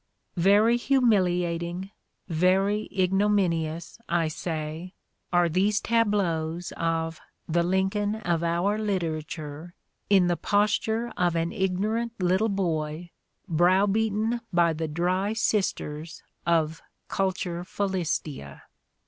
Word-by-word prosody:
" - - -48 0.2
Very 220 +4 +5
humiliating, 185 -8 +1 0.4
very 195 +5 +2
igno 195 +2 +2
minious, 170 -3 -1
I 170 -2 +1
say, 160 +2 -5 0.4
are 175 -1 +4
these 195 +5 +2
tableaux 195 -9 +1 0.2
of 165 -1 -1 0.3
"the 170 +1 +2
Lincoln 190 +4 0
of 175 -6 -1
our 175 +5 +1
literature" 160 -4 -4 0.3
in 195 -3 +5
the 175 0 +2
posture 220 +3 +1
of 175 -2 +1
an 165 0 0
ignorant 215 +5 -1
little 185 +4 +2
boy 170 -3 -2 0.4
browbeaten 205 +6 +2
by 170 -2 +3
the 160 +1 -3
dry 180 +6 0
sisters 170 -7 -2 0.2
of 165 -1 +1 0.3
Culturet 180 -2 -2
Philistia. 170 - -3
180 Hz, 105 wpm, -26 LUFS, 165-205 Hz, 0.4 s, Very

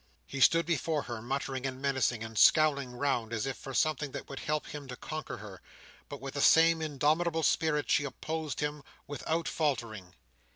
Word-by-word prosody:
He 135 - -6
stood 165 +4 +5
before 160 -2 0
her, 120 -3 -6
muttering 135 +1 -3
and 130 0 -6
menacing, 130 -4 0
and 110 0 -8
scowling 140 +2 +4
round 120 -4 -1
as 115 0 -2
if 135 -1 -3
for 135 -1 -8
something 150 -1 0
that - - -6
would 135 - -6
help 150 0 -2
him 145 -2 -8
to 125 - -6
conquer 155 +4 -6
her; 100 -3 -10 0.5
but - - -7
with 135 +1 -7
the 140 - -2
same 165 +1 +6
indomitable 155 +3 +1
spirit 150 -1 +1
she - - +3
opposed 155 +3 -4
him, 150 0 -2 0.2
without 160 +3 -2
faltering. 110 - -2
140 Hz, 180 wpm, -31 LUFS, 125-155 Hz, 0.5 s, same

